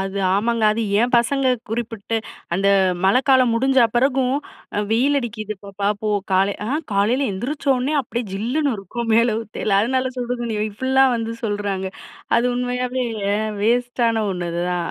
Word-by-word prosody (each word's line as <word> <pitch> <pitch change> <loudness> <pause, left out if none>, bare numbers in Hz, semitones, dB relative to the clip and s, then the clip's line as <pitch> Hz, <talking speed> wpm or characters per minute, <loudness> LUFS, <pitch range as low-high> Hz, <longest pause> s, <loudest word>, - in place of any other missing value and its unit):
அது, 195 +1 -3 0.2
ஆமாங்க. 230 +3 0
அது 225 +2 -2 0.2
ஏம்பசங்க 245 +3 +2 0.2
குறிப்பிட்டு. 225 -1 -3 0.4
அந்த, 195 +2 +2 0.4
மழக்காலம் 255 +4 +4
முடிஞ்ச 265 +3 +2 0.2
பெறகும். 260 +1 +2 0.5
வெயில் 265 +6 +3
அடிக்கிது 215 -3 -5
பாப்பா 200 0 -2
போ 215 - -1 0.2
கால. 195 +2 +3
ஆ! - - -3 0.2
காலையில 225 +8 +2
எந்திரிச்சோனே, 265 +5 -1
அப்டியே 240 -1 -4
ஜில்லுனு 255 +9 0
இருக்கும். 230 +4 -4
மேல 230 -1 +3
ஊத்தைல. 210 -2 -1
அதனால 260 +2 0
சுடுதண்ணி, 240 -2 -3
இப்டிலா 260 +5 +3
வந்து 230 0 -3
சொல்றாங்க. 200 -2 -2 0.5
அது 235 - +2
உண்மையாவே 250 +1 -1 0.6
வேஸ்ட்டான 235 -1 +1
ஒண்ணு 175 -1 -4
இதுதான். 175 0 -2
235 Hz, 130 wpm, -21 LUFS, 205-255 Hz, 0.6 s, மழக்காலம்